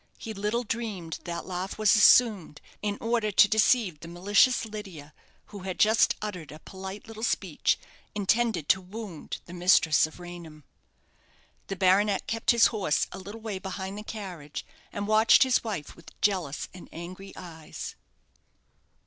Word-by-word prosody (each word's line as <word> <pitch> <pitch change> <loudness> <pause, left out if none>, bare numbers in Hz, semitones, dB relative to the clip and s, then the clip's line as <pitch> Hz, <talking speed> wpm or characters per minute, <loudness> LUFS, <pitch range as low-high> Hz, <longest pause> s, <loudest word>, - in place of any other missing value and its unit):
He 220 - -7
little 210 +4 -1
dreamed 210 -8 -4
that 170 -1 -4
laugh 185 +1 -4
was 215 -1 +4
assumed, 210 -7 +5 0.2
in 205 -1 -2
order 230 -2 0
to 205 - +7
deceive 215 -5 +2
the 165 - -10
malicious 200 +8 +3
Lydia, 190 -9 -9 0.4
who 205 - -7
had 185 -1 -5
just 220 +1 +4
uttered 180 -9 -6
a 155 - -9
polite 190 +5 -9
little 220 -1 -9
speech, 235 - 0 0.4
intended 210 -4 +1
to 190 - +4
wound 190 -3 -8
the 175 - -11
mistress 175 -4 +4
of 160 - -15
Raynham. 170 -4 -10 1.0
The 195 - -4
baronet 195 +1 +3
kept 225 0 -3
his 235 -1 +6
horse 195 -8 +1
a 190 - -7
little 205 +4 -9
way 215 -4 -4
behind 190 +1 -5
the 210 - -7
carriage, 175 -10 -7 0.3
and 205 0 -4
watched 215 +4 +6
his 260 -2 +2
wife 200 -10 -5
with 170 - -17
jealous 180 -9 0
and 180 - -12
angry 185 +4 -9
eyes. 160 -3 -8
195 Hz, 155 wpm, -27 LUFS, 175-215 Hz, 1.0 s, to